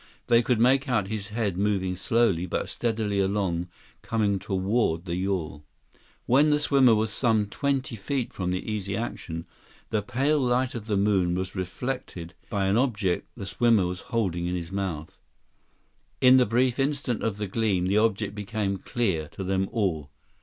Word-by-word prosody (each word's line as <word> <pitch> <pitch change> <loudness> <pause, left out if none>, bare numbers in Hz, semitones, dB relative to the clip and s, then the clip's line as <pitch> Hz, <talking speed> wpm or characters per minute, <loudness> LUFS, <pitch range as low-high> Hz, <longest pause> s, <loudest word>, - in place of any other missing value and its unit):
They 115 0 +5
could 120 -1 +1
make 135 +4 +3
out 105 -6 +1
his 105 -2 -3
head 105 -4 -2
moving 95 -3 0
slowly, 95 -3 +1
but - - -2
steadily 110 -4 -1
along, 95 -3 0 0.3
coming 105 -3 0
toward 95 -2 0
the 85 -2 -3
yawl. 90 -6 -2 0.6
When 140 +5 +4
the 150 0 +3
swimmer 135 -5 +5
was 110 0 0
some 110 -4 +2
twenty 135 +3 -2
feet 120 +4 -3
from 90 -2 -3
the 90 0 -3
Easy 100 -2 -3
Action, 85 -7 -5 0.5
the 110 -2 +1
pale 135 +8 +1
light 125 0 +1
of 115 -2 -6
the 105 -3 +1
moon 95 -3 +2
was 95 0 -3
reflected 95 -2 -5 0.2
by 100 -3 0
an 95 +3 +2
object 105 -8 0
the 100 - -5
swimmer 115 -2 +3
was 90 0 -3
holding 90 -8 -1
in 90 - -1
his 85 0 -5
mouth. 95 -2 -4 1.0
In 130 0 +7
the 125 - +4
brief 125 +3 +1
instant 135 -3 -1
of 110 -3 -1
the 105 - -2
gleam, 100 -3 0
the 100 +3 +3
object 105 -2 0
became 105 -1 -2
clear 95 -7 -1
to 95 - -5
them 95 0 0
all. 85 -10 -1
105 Hz, 170 wpm, -26 LUFS, 95-120 Hz, 1.0 s, In